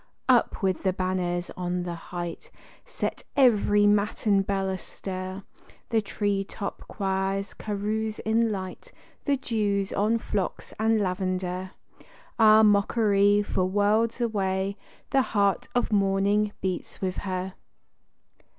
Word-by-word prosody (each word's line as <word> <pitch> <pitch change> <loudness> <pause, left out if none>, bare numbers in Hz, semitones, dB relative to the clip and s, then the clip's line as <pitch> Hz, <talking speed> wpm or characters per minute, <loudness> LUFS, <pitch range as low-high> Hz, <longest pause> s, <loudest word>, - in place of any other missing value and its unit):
Up - - +3
with 190 -1 +1
the 190 -2 +1
banners 180 -1 -2
on 180 0 -2
the 175 -1 -4
height, 170 0 -6 0.4
set - - -4
every 210 -5 +5
matin 205 0 +2
bell 195 0 -1
astir! 190 0 -5 0.5
The 225 -2 +2
tree 200 -1 -1
top 200 +1 -7
choirs 195 0 -2
carouse 215 +1 -3
in 225 +1 +1
light; 190 - -6 0.3
the 285 -2 +2
dew's 205 -5 -1
on 215 +3 +2
phlox 205 -4 -3
and 220 0 +3
lavender: 185 -1 -2 0.7
Ah, 220 0 +7
mockery! 205 -1 +4
for, 185 -2 0
worlds 210 +5 +2
away, 195 -4 0 0.4
the 275 - +4
heart 200 -5 +1
of 245 - +1
morning 200 +1 +2
beats 185 -2 -3
with 185 -2 -2
her. 185 -1 -3
200 Hz, 120 wpm, -26 LUFS, 190-215 Hz, 0.7 s, Ah